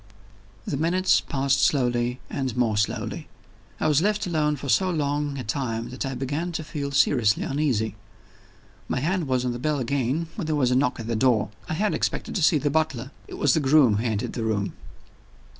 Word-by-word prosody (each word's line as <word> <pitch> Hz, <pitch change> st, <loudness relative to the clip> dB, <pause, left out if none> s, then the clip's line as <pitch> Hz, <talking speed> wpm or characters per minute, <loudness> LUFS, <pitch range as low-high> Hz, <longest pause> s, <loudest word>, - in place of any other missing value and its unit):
The 140 Hz, -, -2 dB
minutes 175 Hz, +5 st, +3 dB
passed 135 Hz, -1 st, 0 dB
slowly 125 Hz, -2 st, +1 dB
and 130 Hz, -3 st, -3 dB
more 115 Hz, -3 st, +2 dB
slowly. 105 Hz, +1 st, -2 dB, 0.5 s
I -, -, +1 dB
was 150 Hz, 0 st, +3 dB
left 210 Hz, +2 st, +1 dB
alone 155 Hz, -4 st, +1 dB
for 140 Hz, 0 st, -7 dB
so 185 Hz, +7 st, +3 dB
long 145 Hz, -3 st, -1 dB
a 130 Hz, -, -4 dB
time 115 Hz, 0 st, -3 dB
that 130 Hz, +2 st, -4 dB
I 135 Hz, -, -4 dB
began 145 Hz, +7 st, -2 dB
to 160 Hz, -, -3 dB
feel 150 Hz, -2 st, -4 dB
seriously 125 Hz, -6 st, +3 dB
uneasy. 125 Hz, -8 st, 0 dB, 0.9 s
My -, -, -1 dB
hand 170 Hz, +3 st, -1 dB
was 130 Hz, -1 st, 0 dB
on 125 Hz, -, 0 dB
the 120 Hz, -, -5 dB
bell 150 Hz, +3 st, 0 dB
again, 135 Hz, +4 st, -1 dB
when 185 Hz, -7 st, -5 dB
there 155 Hz, -, 0 dB
was 130 Hz, -4 st, +2 dB
a -, -, +3 dB
knock 130 Hz, -2 st, +1 dB
at 115 Hz, -, -5 dB
the 115 Hz, 0 st, -2 dB
door. 110 Hz, -3 st, +2 dB, 0.2 s
I 160 Hz, -, -1 dB
had 210 Hz, +5 st, +1 dB
expected -, -, -2 dB
to 180 Hz, -, 0 dB
see 155 Hz, 0 st, +5 dB
the 145 Hz, 0 st, 0 dB
butler. 140 Hz, -4 st, -1 dB, 0.2 s
It -, -, -8 dB
was 145 Hz, -4 st, +3 dB
the -, -, +3 dB
groom 135 Hz, -6 st, +4 dB
who 110 Hz, -, -1 dB
entered 110 Hz, -3 st, -2 dB
the 120 Hz, -, -4 dB
room. 105 Hz, -3 st, -1 dB
135 Hz, 205 wpm, -25 LUFS, 120-155 Hz, 0.9 s, see